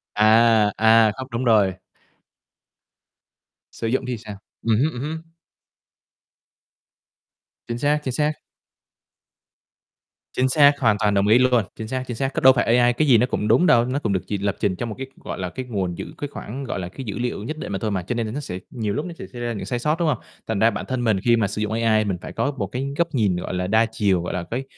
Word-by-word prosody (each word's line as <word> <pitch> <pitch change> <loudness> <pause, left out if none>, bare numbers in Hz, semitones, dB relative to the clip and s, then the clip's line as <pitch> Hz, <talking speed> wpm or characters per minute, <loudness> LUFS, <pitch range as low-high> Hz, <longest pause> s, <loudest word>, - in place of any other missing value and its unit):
À! 110 0 +5
À, 110 0 +5
không 130 - -6
đúng 115 +2 -2
rồi. 105 -6 +4 2.0
Sử 115 - -4
dụng 130 +3 0
thì 125 -2 -3
sao? 105 -2 -9 0.3
Ừm 115 -2 +2
hứm, 145 +7 +2
ừm 125 - -6
hứm. 160 +2 -4 2.5
Chính 120 - -3
xác, 145 +4 +1
chính 130 - -3
xác. 150 +3 +1 2.0
Chính 130 +1 +1
xác, 145 +1 +5
hoàn 110 -5 +3
toàn 105 -2 +2
đồng 100 0 +2
ý 110 +3 +6
luôn! 125 -2 +3
Chính 110 - -6
xác, 130 +2 -3
chính 120 - -4
xác. 135 +2 -2
Cứ - - -2
đâu 130 0 +8
phải 120 -1 +2
AI 120 0 +4
cái 155 +5 +1
gì 125 -4 +6
nó 120 - +3
cũng 105 -4 -2
đúng 125 +11 +4
đâu, 120 -7 +5
nó 130 +3 -1
cũng 110 -9 -1
được 95 - +1
chỉ 105 - -2
lập 100 0 -1
trình 100 -3 0
trong 120 +5 -4
một 105 - -6
cái, 135 - -5 0.2
gọi - - -6
là, 90 -1 -3
cái 130 +8 -6
nguồn 95 -7 -3
dữ - - -5
cái 145 - -4
khoảng, 135 -1 -7
gọi 120 -7 -4
là, 90 - -5
cái 135 +8 -8
dữ 100 -3 -5
liệu 120 -3 -3
nhất 155 +7 -5
định 155 - -6
mà 95 - -2
thôi 110 - -2
mà, 95 -2 -1
cho 120 - -3
nên 115 -1 -1
là - - -5
nó 145 - -3
sẽ 90 -11 -6
nhiều 110 -5 -2
lúc 150 - -2
nó 175 - -6
sẽ - - -6
xảy 120 -1 -9
ra 120 -1 -2
những 105 - -5
sai 120 -1 -2
sót, 150 +6 0
đúng 170 - +1
hông? 145 -6 +1 0.3
Thành 110 -3 -1
ra 110 - +5
bản 105 - -5
thân 130 -2 -2
mình 110 -4 +2
khi 120 +4 +3
mà 110 -4 +1
sử 105 - -4
dụng 105 - -2
AI 110 -1 +2
mình 95 -3 -1
phải - - -8
có 140 - 0
một - - -2
cái 130 +2 -4
góc 170 - +2
nhìn, 105 -7 +2
gọi 90 - -4
là, 90 0 -2
đa 110 +3 +3
chiều, 100 -5 0
gọi 90 - -4
là, 90 - -2
cái 125 +3 -2
115 Hz, 250 wpm, -22 LUFS, 105-130 Hz, 2.5 s, đâu